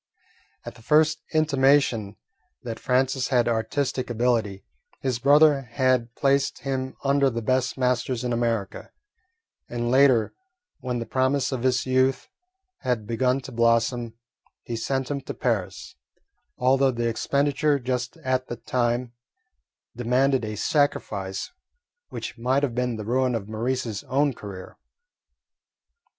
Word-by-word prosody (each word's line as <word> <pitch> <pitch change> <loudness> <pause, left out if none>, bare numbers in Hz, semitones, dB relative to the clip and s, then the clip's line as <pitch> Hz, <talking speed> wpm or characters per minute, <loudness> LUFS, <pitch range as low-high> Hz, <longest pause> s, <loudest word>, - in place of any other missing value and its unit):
At - - -7
the 115 - -17
first 155 +4 +3
intimation 140 - +2 0.5
that 115 -2 -5
Francis 130 0 +1
had 120 -3 +2
artistic 125 +3 -1
ability, 115 -4 0 0.3
his 130 -3 -2
brother 145 +1 +5
had 130 -3 +1
placed 140 0 +1
him 130 -1 -3
under 140 0 +3
the 115 -2 -4
best 130 +3 0
masters 125 -1 0
in 125 -1 -1
America, 115 -4 -2 0.8
and 120 0 -2
later, 130 -4 +4 0.5
when 125 -2 -3
the 115 - -4
promise 130 +2 0
of 130 -3 -3
his 130 0 +1
youth 130 0 +1 0.5
had 125 -4 -1
begun 125 +4 0
to 135 - -9
blossom, 115 0 +1 0.5
he 120 - -5
sent 130 +3 -2
him 140 -1 -2
to - - -7
Paris, - - -2 0.6
although 135 +2 +3
the 120 -2 -1
expenditure 140 +5 +1
just 125 +3 -3
at 130 0 0
that 120 - -8
time 120 0 0 0.8
demanded 125 +2 +1
a 110 0 -4
sacrifice 100 - -1 0.6
which - - -7
might 130 +4 +1
have 130 -4 0
been 125 0 -1
the 110 -1 -6
ruin 125 +2 +1
of 105 -3 -4
Maurice's 115 -1 -3
own 140 +1 +1
career. 100 -5 -10
125 Hz, 130 wpm, -25 LUFS, 115-135 Hz, 0.8 s, brother